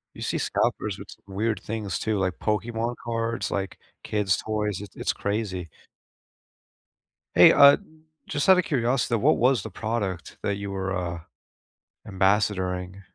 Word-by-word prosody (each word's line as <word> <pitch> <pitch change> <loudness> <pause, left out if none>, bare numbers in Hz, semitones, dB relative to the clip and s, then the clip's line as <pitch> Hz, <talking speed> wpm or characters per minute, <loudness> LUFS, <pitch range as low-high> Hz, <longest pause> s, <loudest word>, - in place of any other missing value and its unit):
You - - -10
see - - -1
scalpers - - -1
with - - -10
s - - -10
weird 100 +1 -2
things 110 -2 -3
too, 110 -2 -1
like 95 -3 -1
Pokemon 115 +2 -1
cards, 115 +1 -2
like, 95 -1 -3 0.3
kids' 105 -3 +1
toys, 105 -2 -2
it's 100 - -10
it's - - -1
crazy. 100 -5 -3 1.7
Hey, - - +8
uh, 140 0 +8 0.5
just 145 +4 -1
outta 185 -1 +7
curiosity, 125 -5 0
what 105 - +3
was 125 +1 +3
the 110 - -6
product 100 -4 -3
that 100 - 0
you 100 -1 -5
were, 95 0 -3
uh, 85 -2 -3 0.9
ambassadoring? 95 -2 0
105 Hz, 140 wpm, -25 LUFS, 95-115 Hz, 1.7 s, Hey